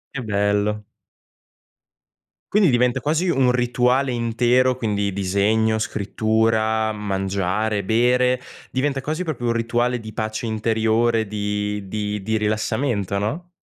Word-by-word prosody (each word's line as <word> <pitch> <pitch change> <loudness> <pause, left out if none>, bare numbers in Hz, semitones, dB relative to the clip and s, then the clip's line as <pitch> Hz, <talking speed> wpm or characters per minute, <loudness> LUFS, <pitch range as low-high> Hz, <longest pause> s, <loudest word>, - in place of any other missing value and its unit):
Che 125 - -3
bello. 105 0 0 1.7
Quindi 205 -5 +4
diventa 125 0 +2
quasi 160 +5 0
un 135 -6 +3
rituale 125 +2 +1
intero, 120 +2 +2
quindi: 105 -4 -1
disegno, 105 +3 +1
scrittura, 110 +1 0
mangiare, 100 +1 -1
bere, 125 +4 +2 0.3
diventa 135 +1 -1
quasi 155 +6 -3
proprio 135 -8 -3
un 115 - +2
rituale 120 +1 0
di 110 -1 -9
pace 110 +1 -3
interiore, 110 0 +1
di 105 -1 -3
di 105 0 -3
di 110 +2 -1
rilassamento, 105 -1 -1
no? 155 - -3
110 Hz, 115 wpm, -22 LUFS, 105-125 Hz, 1.7 s, Quindi